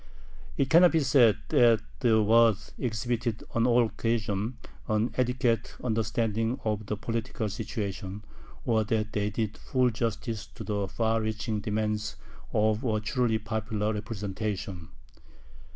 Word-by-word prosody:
It 135 -1 +1
cannot 175 +1 +7
be 160 - +4
said 125 -6 +5
that 115 -2 +5 0.2
the 110 -3 +4
Waads 110 -1 +4
exhibited 120 -1 -2
on 115 +1 +2
all 120 -1 +5
occasions 110 0 -1 0.3
an 110 +2 +1
adequate 125 -3 0
understanding 115 0 0
of 105 -1 -1
the 105 - -2
political 115 +1 -3
situation, 100 -1 -4 0.4
or 110 -2 +2
that 110 0 -1
they 105 0 0
did 110 0 -3
full 130 -2 +1
justice 115 -1 -3
to - - -7
the 100 -2 -1
far 115 +3 0
reaching 110 0 -2
demands 105 0 -2 0.4
of 110 +2 +2
a 110 -4 +1
truly 110 +1 +1
popular 110 0 -2
representation. 105 -4 -4
110 Hz, 130 wpm, -28 LUFS, 105-115 Hz, 0.4 s, cannot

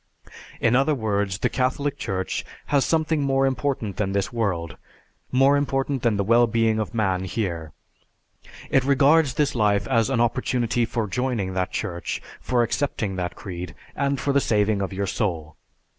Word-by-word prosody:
In 115 +1 +3
other 140 +4 +3
words, 100 -5 -1
the - - +1
Catholic 135 +2 -1
Church 95 -8 -3 0.3
has 140 -2 +5
something 160 -1 +1
more 135 -1 +2
important 130 -6 -1
than 100 -2 -1
this 100 +3 -1
world, 90 -8 -1 0.6
more 135 +2 +5
important 135 -1 0
than 115 -4 +1
the 100 - +1
well 115 +3 +4
being 115 -1 +1
of 110 +2 -3
man 95 -4 +1
here. 85 -6 -3 1.0
It 135 - +4
regards 140 +1 +4
this 150 -2 +1
life 105 -3 +2
as 115 -2 +2
an 135 -3 0
opportunity 120 0 +1
for 115 -1 -2
joining 115 -3 -1
that 90 0 -1
Church, 85 -1 -3 0.2
for 125 -2 +1
accepting 115 -5 -1
that 90 -1 -3
creed, 90 -5 -7 0.2
and 140 -1 0
for 140 +2 0
the 140 - +4
saving 105 -3 +1
of 95 - -2
your 100 +1 -2
soul. 85 -7 -2
115 Hz, 165 wpm, -24 LUFS, 100-135 Hz, 1.0 s, has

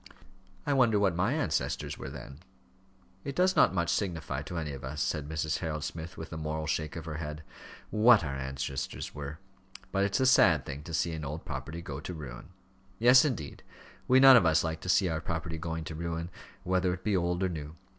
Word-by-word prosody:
"I 145 - +1
wonder 120 -5 +4
what 100 -3 +2
my 100 +9 +1
ancestors 145 - -1
were - - -7
then?" 70 +1 -10 0.8
"It 140 - -5
does 185 +1 +3
not - - +5
much 85 -2 +1
signify 80 -8 -2
to 85 +3 -6
any 80 -3 -3
of 70 -1 -8
us," 70 +3 -5
said 75 +2 -1
Mrs. 80 -1 -1
Harold 75 -3 -3
Smith, 80 +2 -6
with 80 +1 -7
a - - -4
moral 80 0 -3
shake 80 -1 -2
of 85 -2 -6
her 80 -2 -5
head, 75 0 -6 0.5
"what 110 -1 +6
our 70 -3 -3
ancestors 65 0 -4
were; 75 +1 -6 0.5
but 100 0 +1
it's 100 +4 +1
a 130 - +3
sad 85 - +5
thing 70 +1 -6
to 85 - -7
see 85 +1 0
an 80 -1 -5
old 75 +3 -5
property 75 +4 -6
go 70 -3 -6
to 90 +4 -6
ruin." 70 -2 -9 0.5
"Yes, 125 +4 +7
indeed; 110 - -3 0.5
we 130 +1 +6
none 135 0 +10
of 95 - +4
us 80 0 +3
like 80 -1 -3
to 90 - -6
see 95 +1 +4
our 80 -2 -2
property 80 0 -4
going 80 0 -4
to 80 - -6
ruin, 85 +1 -4 0.3
whether 90 0 +1
it 90 - -15
be 105 -3 +1
old 90 0 0
or 95 - +1
new. 75 -2 -6
80 Hz, 215 wpm, -30 LUFS, 75-95 Hz, 0.8 s, none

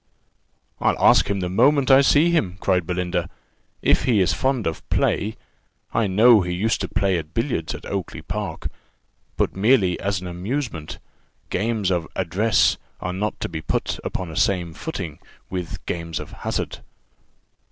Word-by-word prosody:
"I'll - - +2
ask - - +5
him 100 -1 0
the 90 - -1
moment 135 +8 +4
I 135 +1 +8
see 150 +4 +4
him," 100 - 0
cried 90 -4 +1
Belinda, 90 -1 -1 0.5
"if - - +3
he 115 -5 +3
is 95 - +3
fond 130 -4 0
of 80 - -4
play: 105 +2 +1 0.6
I 115 -2 +2
know 110 +3 +6
he 90 -1 -2
used 110 +5 0
to - - -1
play 95 -3 +1
at 80 0 -10
billiards 115 - -1
at - - -10
Oakly 90 -5 -4
park, 95 -3 -4 0.7
but - - 0
merely 100 -3 +3
as 100 -1 -1
an 90 - -9
amusement. 90 - -4 0.5
Games 105 -1 0
of 85 -3 0
address 95 +5 +2 0.2
are 90 - -3
not 105 +3 -2
to - - -1
be 80 -2 -5
put - - -2
upon 90 -3 -4
a 85 +1 0
footing 85 - -5 0.3
with 90 -2 -5
games 85 -1 -3
of - - -8
hazard. - - -4
95 Hz, 160 wpm, -23 LUFS, 90-115 Hz, 0.7 s, I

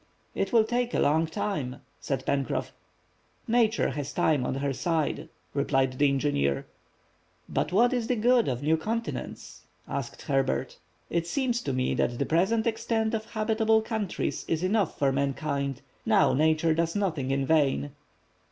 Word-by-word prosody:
"It - - -1
will 230 -3 +5
take 240 +2 -1
a - - +2
long 160 +3 +3
time," 150 -6 -3 0.2
said 135 -2 -3
Pencroff. 140 -2 -1 0.8
"Nature 230 - +2
has 145 +1 -4
time 145 -6 +2
on - - -2
her 135 0 -1
side," 160 +1 -1 0.2
replied 135 -2 +1
the 145 -1 +5
engineer. 130 - 0 0.8
"But - - -1
what 235 +7 +4
is 240 -3 -1
the 250 - +1
good 240 +1 +3
of 125 +1 -2
new 160 +2 +3
continents?" 225 +8 -4 0.3
asked - - -5
Herbert. 135 - -1 0.3
"It 170 0 0
seems 245 +2 0
to 140 - -2
me 130 0 0
that 120 - 0
the 140 - 0
present 195 +9 +2
extent 225 0 0
of 220 -1 -2
habitable 220 0 +1
countries 220 -4 -2
is 165 +1 -1
enough 200 -1 +1
for 140 -1 +2
mankind. 140 0 -2 0.2
Now - - +4
Nature 160 +2 +3
does 165 +2 0
nothing 165 -10 -1
in 135 0 +1
vain." 145 -2 +2
160 Hz, 155 wpm, -27 LUFS, 140-220 Hz, 0.8 s, will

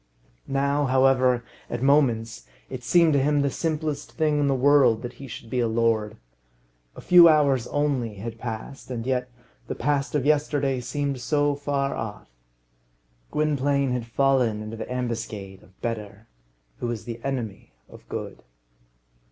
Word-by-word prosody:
Now, 140 +1 +1
however, 130 -2 +3 0.3
at 120 +1 -3
moments, 115 - +2 0.2
it 130 -1 -6
seemed 165 +5 +4
to 140 - +3
him 145 +1 +2
the 140 - 0
simplest 155 -3 -3
thing 155 -2 +1
in 145 - +2
the 135 - +2
world 130 -4 +4
that 120 0 -5
he 135 - -7
should 115 -1 -9
be 125 +2 -2
a 120 - +2
lord. 110 -1 0 0.8
A - - -10
few 175 -2 +8
hours 140 -6 +3
only 135 -7 -1
had 115 +3 -7
passed, 120 +4 -7
and 120 -2 -4
yet 125 -1 -1 0.4
the - - -4
past 145 +2 -1
of 145 -2 0
yesterday 145 -3 +1
seemed 140 +1 -3
so 145 +2 +1
far 140 -1 -1
off! 105 - -6 1.0
Gwynplaine 140 -2 +1
had 125 -2 -2
fallen 125 -4 +1
into 110 +1 -6
the 115 - -7
ambuscade 115 -6 -4
of 95 +1 -23
Better, 105 -2 -5 0.5
who 120 - -3
is 115 -3 -4
the 115 -1 -6
enemy 125 -7 -4 0.2
of - - -16
Good. - - -6
130 Hz, 155 wpm, -25 LUFS, 115-145 Hz, 1.0 s, few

